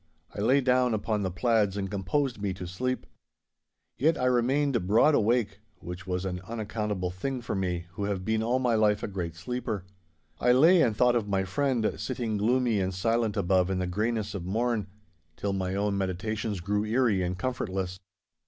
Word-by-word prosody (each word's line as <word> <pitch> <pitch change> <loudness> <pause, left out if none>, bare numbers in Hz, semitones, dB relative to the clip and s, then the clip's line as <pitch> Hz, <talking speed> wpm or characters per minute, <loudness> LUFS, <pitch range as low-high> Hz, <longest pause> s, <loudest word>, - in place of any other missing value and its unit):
I 100 - -4
lay 130 +6 +4
down 125 -2 +3
upon 105 0 -1
the 95 - -1
plaids 100 +2 +1
and 95 -1 -2
composed 105 +5 -1
me 100 -2 -1
to 90 -1 -6
sleep. 125 +9 -3 0.9
Yet 155 +4 +3
I 125 - 0
remained 125 -3 +2
broad 115 +10 +5
awake, 110 -4 +1 0.2
which 90 +2 -8
was 90 +1 -2
an 90 -1 -3
unaccountable 105 -4 -3
thing 125 +9 -3
for 120 - -4
me, 90 -3 -2
who 100 +3 -4
have 100 -2 -2
been 110 0 +1
all 120 +3 +1
my 125 -2 +1
life 105 -2 +2
a - - -1
great 90 -5 -4
sleeper. 110 0 -4 0.5
I 125 0 +4
lay 165 +7 +6
and 115 -7 +2
thought 125 -1 +4
of 110 -3 0
my 95 -1 +1
friend, 125 +2 0
sitting 115 -4 -2
gloomy 120 +1 +2
and 95 -1 -1
silent 115 +2 0
above 95 -1 +2
in 95 - 0
the 90 - -1
greyness 105 +3 -1
of 95 -4 -4
morn, 110 +2 -1 0.5
till 100 -1 -2
my 95 -1 -2
own 100 0 0
meditations 100 +2 -2
grew 105 +3 0
eerie 110 -3 +2
and 90 0 -2
comfortless. 95 -7 -3
105 Hz, 185 wpm, -28 LUFS, 95-120 Hz, 0.9 s, lay